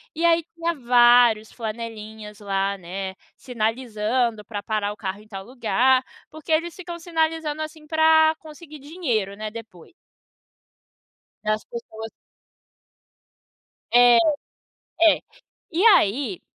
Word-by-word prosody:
E 330 Hz, +2 st, 0 dB
aí 335 Hz, 0 st, +4 dB
tinha 335 Hz, 0 st, -1 dB
vários 240 Hz, -3 st, +4 dB
flanelinhas 220 Hz, -2 st, -7 dB
lá, 195 Hz, -1 st, -1 dB
né, 190 Hz, +1 st, -6 dB, 0.2 s
sinalizando 230 Hz, -1 st, -1 dB
para 205 Hz, -1 st, -6 dB
parar 210 Hz, -2 st, -1 dB
o -, -, -17 dB
carro 200 Hz, 0 st, -5 dB
em 215 Hz, -, -19 dB
tal 195 Hz, -3 st, -8 dB
lugar, 255 Hz, +2 st, +2 dB, 0.3 s
porque 315 Hz, +1 st, -8 dB
eles 330 Hz, +2 st, +1 dB
ficam 350 Hz, -2 st, -7 dB
sinalizando 320 Hz, -2 st, -1 dB
assim 310 Hz, 0 st, -7 dB
para 315 Hz, 0 st, +4 dB
conseguir 310 Hz, -1 st, -12 dB
dinheiro, 265 Hz, -, -2 dB
né, 215 Hz, 0 st, -6 dB
depois. 215 Hz, -7 st, -12 dB, 1.5 s
As 215 Hz, 0 st, -1 dB
pessoas. 225 Hz, -2 st, -8 dB, 1.8 s
É, 245 Hz, 0 st, +7 dB, 0.9 s
é, 330 Hz, -2 st, +6 dB, 0.5 s
e 345 Hz, +5 st, +1 dB
aí, 230 Hz, -, +3 dB
240 Hz, 110 wpm, -23 LUFS, 215-315 Hz, 1.8 s, É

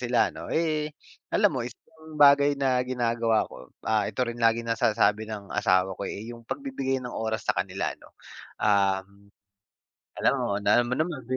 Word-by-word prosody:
sila 125 Hz, -1 st, +2 dB
ano -, -, -9 dB
eh, 155 Hz, -2 st, 0 dB, 0.4 s
alam 205 Hz, -4 st, +3 dB
mo 130 Hz, -, -2 dB
yung 115 Hz, -, -3 dB
isang -, -, -19 dB, 0.3 s
bagay 145 Hz, 0 st, +6 dB
na 130 Hz, -2 st, +2 dB
gina-gawa 115 Hz, -3 st, +1 dB
ko -, -, -12 dB, 0.2 s
ah, 110 Hz, -1 st, +2 dB
ito 125 Hz, -, -1 dB
rin 120 Hz, 0 st, -6 dB
laging 115 Hz, 0 st, +2 dB
na-sasabi 110 Hz, -1 st, +2 dB
ng 105 Hz, -2 st, -7 dB
asawa 95 Hz, -2 st, +2 dB
ko -, -, -7 dB
eh, 110 Hz, +4 st, -6 dB
yung 115 Hz, 0 st, -12 dB
pag-bibigay 200 Hz, -, -2 dB
ng 125 Hz, -1 st, -7 dB
oras 110 Hz, -1 st, -2 dB
sa -, -, +2 dB
kanila -, -, -2 dB
'no -, -, -17 dB, 0.5 s
ah 100 Hz, -2 st, +2 dB, 1.2 s
alam -, -, +3 dB
mo, 100 Hz, 0 st, -1 dB
na 100 Hz, +1 st, +3 dB
alam 120 Hz, -, -3 dB
mo 125 Hz, -, +1 dB
naman. 155 Hz, -5 st, -2 dB
120 Hz, 180 wpm, -26 LUFS, 105-135 Hz, 1.2 s, bagay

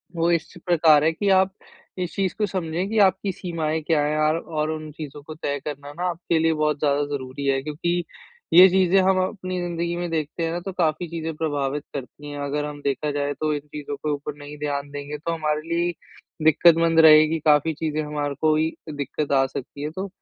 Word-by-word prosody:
वो 170 Hz, +1 st, +2 dB
इस 165 Hz, -1 st, -1 dB
प्रकार 160 Hz, -4 st, +5 dB
है 160 Hz, -, +4 dB
कि 195 Hz, +5 st, -1 dB
आप 190 Hz, 0 st, +4 dB, 0.5 s
इस 180 Hz, -3 st, -3 dB
चीज़ 195 Hz, -2 st, 0 dB
को 215 Hz, -, +1 dB
समझें 180 Hz, -1 st, -2 dB
कि 220 Hz, -, -2 dB
आपकी 190 Hz, +1 st, 0 dB
सीमाएँ 160 Hz, -4 st, -3 dB
क्या 160 Hz, -3 st, +3 dB
है 150 Hz, +1 st, 0 dB
आर 155 Hz, -, +2 dB
और 155 Hz, -2 st, -3 dB
उन 155 Hz, -1 st, -6 dB
चीज़ों 150 Hz, -1 st, -8 dB
को 155 Hz, -, -8 dB
तय 145 Hz, -2 st, -3 dB
करना 145 Hz, -1 st, -6 dB
ना 175 Hz, +4 st, -5 dB
आपके 170 Hz, -1 st, -1 dB
लिए 160 Hz, 0 st, +3 dB
बहुत 150 Hz, -1 st, 0 dB
ज़्यादा 145 Hz, -1 st, +2 dB
ज़रूरी 130 Hz, +1 st, -6 dB
है। 135 Hz, -1 st, +2 dB
क्योंकि 170 Hz, +4 st, -1 dB, 0.5 s
ये 180 Hz, +3 st, +10 dB
चीज़ें 190 Hz, 0 st, +4 dB
हम 190 Hz, 0 st, +3 dB
अपनी 185 Hz, -1 st, -4 dB
ज़िन्दगी 170 Hz, 0 st, -2 dB
में 175 Hz, 0 st, -3 dB
देखते 160 Hz, +1 st, -2 dB
हैं 165 Hz, -, -1 dB
ना 170 Hz, -, -2 dB
तो 195 Hz, -, -3 dB
काफ़ी 170 Hz, -1 st, 0 dB
चीज़ें 165 Hz, -1 st, -4 dB
प्रभावित 145 Hz, -2 st, -2 dB
करती 145 Hz, +2 st, -7 dB
है। 145 Hz, -, -6 dB
अगर 145 Hz, +1 st, -2 dB
हम 145 Hz, -1 st, -7 dB
देखा 145 Hz, +2 st, -1 dB
जाए 145 Hz, 0 st, -1 dB
तो 155 Hz, -1 st, 0 dB
इन 145 Hz, -, -1 dB
चीज़ों 145 Hz, -1 st, -5 dB
के 150 Hz, +2 st, -3 dB
ऊपर 145 Hz, 0 st, -4 dB
नहीं 145 Hz, +1 st, -10 dB
ध्यान 145 Hz, -1 st, -3 dB
देंगे 145 Hz, +1 st, -6 dB
तो 160 Hz, +3 st, -3 dB
हमारे 155 Hz, -2 st, -1 dB
लिए 170 Hz, +1 st, +1 dB, 0.5 s
दिक्कत 160 Hz, +2 st, +6 dB
मंद 165 Hz, 0 st, +3 dB
रहेगी। 155 Hz, 0 st, +7 dB
काफ़ी 150 Hz, +1 st, +4 dB
चीज़ें 155 Hz, 0 st, -2 dB
हमारे 145 Hz, -1 st, -3 dB
को 155 Hz, -1 st, +4 dB
ही 160 Hz, +1 st, +1 dB, 0.2 s
दिक्कत 145 Hz, 0 st, -3 dB
आ 135 Hz, -1 st, +4 dB
सकती 135 Hz, +1 st, -7 dB
है। 150 Hz, -, -2 dB
तो 190 Hz, +4 st, -4 dB
155 Hz, 215 wpm, -23 LUFS, 145-170 Hz, 0.5 s, ये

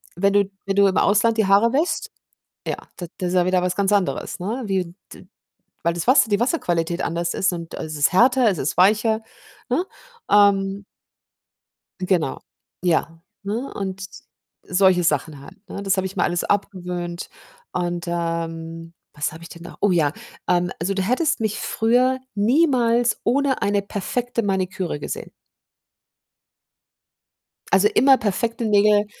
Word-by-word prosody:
wenn 200 Hz, +2 st, +2 dB
du 200 Hz, -1 st, +3 dB, 0.2 s
wenn 195 Hz, 0 st, -1 dB
du 200 Hz, 0 st, +5 dB
im 185 Hz, -, 0 dB
Ausland 225 Hz, +3 st, +3 dB
die 220 Hz, -, +3 dB
Haare 205 Hz, +4 st, +4 dB
wäscht, 315 Hz, +6 st, 0 dB, 0.6 s
ja, -, -, -2 dB, 0.2 s
d 175 Hz, -, -5 dB
das 180 Hz, -1 st, -1 dB
ist -, -, -3 dB
ja 180 Hz, -1 st, +3 dB
wieder 185 Hz, 0 st, +2 dB
was 180 Hz, 0 st, -1 dB
ganz 200 Hz, 0 st, +1 dB
anderes, 195 Hz, -2 st, -1 dB
ne, 225 Hz, +8 st, -3 dB
wie 185 Hz, -3 st, -2 dB, 0.2 s
d -, -, -15 dB, 0.6 s
weil 170 Hz, 0 st, +1 dB
das 170 Hz, +4 st, -4 dB
Wasser 255 Hz, -3 st, +5 dB
die 205 Hz, +1 st, +2 dB
Wasserqualität 175 Hz, -, 0 dB
anders 170 Hz, +1 st, -2 dB
ist 190 Hz, -1 st, +1 dB
und 170 Hz, -1 st, -7 dB
es 155 Hz, -1 st, -6 dB
ist 145 Hz, -1 st, +2 dB
härter, 245 Hz, +4 st, +4 dB
es 185 Hz, -, -1 dB
ist 140 Hz, -, -2 dB
weicher, 220 Hz, +4 st, +3 dB, 0.5 s
ne? 360 Hz, -, 0 dB, 0.5 s
Ähm 200 Hz, -1 st, +3 dB, 1.2 s
Genau, 180 Hz, -7 st, 0 dB, 0.4 s
ja, 165 Hz, -1 st, 0 dB, 0.2 s
ne, 225 Hz, +7 st, -4 dB
und 190 Hz, -1 st, -4 dB, 0.6 s
solche 185 Hz, -1 st, +3 dB
Sachen 150 Hz, -1 st, -1 dB
halt, 185 Hz, +8 st, -13 dB
ne? 200 Hz, -, -6 dB
Das 195 Hz, 0 st, +1 dB
habe 190 Hz, 0 st, -1 dB
ich 190 Hz, +1 st, -8 dB
mir -, -, +1 dB
alles 175 Hz, 0 st, 0 dB
abgewöhnt 180 Hz, -3 st, -3 dB, 0.4 s
und, 175 Hz, -1 st, -2 dB
ähm, 165 Hz, -1 st, -4 dB, 0.2 s
was 150 Hz, +1 st, -2 dB
habe 160 Hz, -, -11 dB
ich 170 Hz, -, -11 dB
denn 170 Hz, -, -11 dB
noch -, -, -11 dB
oh 205 Hz, -, +4 dB
ja. 155 Hz, -5 st, +2 dB, 0.4 s
Ähm, 175 Hz, +1 st, +2 dB
also 195 Hz, +4 st, -1 dB
du 190 Hz, -, -1 dB
hättest 250 Hz, -, 0 dB
mich 215 Hz, -1 st, -2 dB
früher 250 Hz, +3 st, +2 dB, 0.2 s
niemals 240 Hz, 0 st, +2 dB
ohne 275 Hz, +2 st, +1 dB
eine 200 Hz, 0 st, +1 dB
perfekte 235 Hz, +4 st, -3 dB
Maniküre 190 Hz, -5 st, -2 dB
gesehen. -, -, -6 dB, 2.4 s
Also 195 Hz, +2 st, +5 dB
immer 265 Hz, +2 st, +5 dB
perfekte 230 Hz, +3 st, -2 dB
Nägel, 210 Hz, -1 st, +4 dB
195 Hz, 155 wpm, -22 LUFS, 175-220 Hz, 2.4 s, du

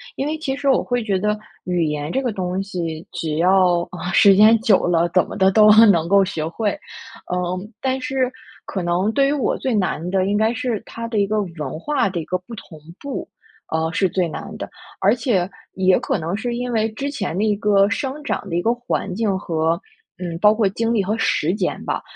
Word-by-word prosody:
因 275 Hz, -, -2 dB
为 310 Hz, +1 st, -2 dB
其 275 Hz, -4 st, -3 dB
实 280 Hz, 0 st, -1 dB
我 270 Hz, -, +3 dB
会 245 Hz, -2 st, -1 dB
觉 200 Hz, -3 st, 0 dB
得 210 Hz, +2 st, 0 dB, 0.3 s
语 175 Hz, -2 st, 0 dB
言 150 Hz, 0 st, -3 dB
这 265 Hz, -, 0 dB
个 245 Hz, -3 st, -1 dB
东 185 Hz, -1 st, -2 dB
西， 170 Hz, -4 st, -5 dB
只 155 Hz, -2 st, -3 dB
要 180 Hz, 0 st, +3 dB, 0.3 s
时 200 Hz, -1 st, +7 dB
间 215 Hz, +3 st, +7 dB
久 215 Hz, -4 st, +3 dB
了， 170 Hz, -1 st, +2 dB
怎 180 Hz, 0 st, +2 dB
么 -, -, -8 dB
的 190 Hz, 0 st, +4 dB
都 210 Hz, +1 st, +7 dB, 0.2 s
能 170 Hz, -5 st, +3 dB
够 200 Hz, +2 st, +5 dB
学 160 Hz, -4 st, -3 dB
会。 210 Hz, +6 st, -1 dB, 0.6 s
嗯， 180 Hz, +4 st, -3 dB
但 265 Hz, 0 st, 0 dB
是 255 Hz, 0 st, -1 dB, 0.3 s
可 190 Hz, -, -4 dB
能 175 Hz, +5 st, +1 dB
对 275 Hz, +2 st, +3 dB
于 280 Hz, -, +1 dB
我 290 Hz, -, 0 dB
最 260 Hz, -, -2 dB
难 185 Hz, -5 st, -1 dB
的 190 Hz, -1 st, +1 dB
应 205 Hz, +1 st, +1 dB
该 220 Hz, +2 st, +2 dB
是 235 Hz, -2 st, -2 dB
它 230 Hz, 0 st, -6 dB
的 230 Hz, -2 st, -3 dB
一 200 Hz, -, +3 dB
个 210 Hz, +1 st, 0 dB
文 160 Hz, -6 st, -6 dB
化 280 Hz, -, 0 dB
的 180 Hz, -2 st, -3 dB
一 160 Hz, -, -5 dB
个 185 Hz, -, -1 dB
不 180 Hz, +6 st, -13 dB
同 160 Hz, -6 st, -12 dB, 0.2 s
步， 280 Hz, -1 st, -5 dB, 0.4 s
啊， 160 Hz, 0 st, -1 dB
是 190 Hz, +1 st, +1 dB
最 180 Hz, 0 st, 0 dB
难 155 Hz, -, -7 dB
的。 -, -, -5 dB, 0.3 s
而 200 Hz, +5 st, +4 dB
且 195 Hz, -9 st, 0 dB, 0.2 s
也 185 Hz, -1 st, +3 dB
可 -, -, -1 dB
能 170 Hz, +5 st, -3 dB
是 240 Hz, +1 st, -3 dB
因 245 Hz, +1 st, -3 dB
为 220 Hz, 0 st, +1 dB
之 275 Hz, +6 st, -4 dB
前 200 Hz, -, -4 dB
的 200 Hz, -, 0 dB
一 215 Hz, -1 st, +2 dB
个 200 Hz, -1 st, +3 dB
生 275 Hz, +5 st, -3 dB
长 210 Hz, -, -3 dB
的 170 Hz, -, -3 dB
一 175 Hz, -, +1 dB
个 225 Hz, -, +2 dB
环 235 Hz, -6 st, -3 dB
境 205 Hz, -4 st, 0 dB
和 165 Hz, 0 st, -1 dB, 0.4 s
嗯， 170 Hz, -2 st, -5 dB
包 210 Hz, +2 st, +6 dB
括 215 Hz, -3 st, +1 dB
精 230 Hz, +4 st, -1 dB
力 210 Hz, -4 st, +2 dB
和 210 Hz, +4 st, -1 dB
时 170 Hz, -6 st, +1 dB
间 205 Hz, -, -2 dB
吧， -, -, -2 dB
200 Hz, 240 characters per minute, -21 LUFS, 175-230 Hz, 0.6 s, 时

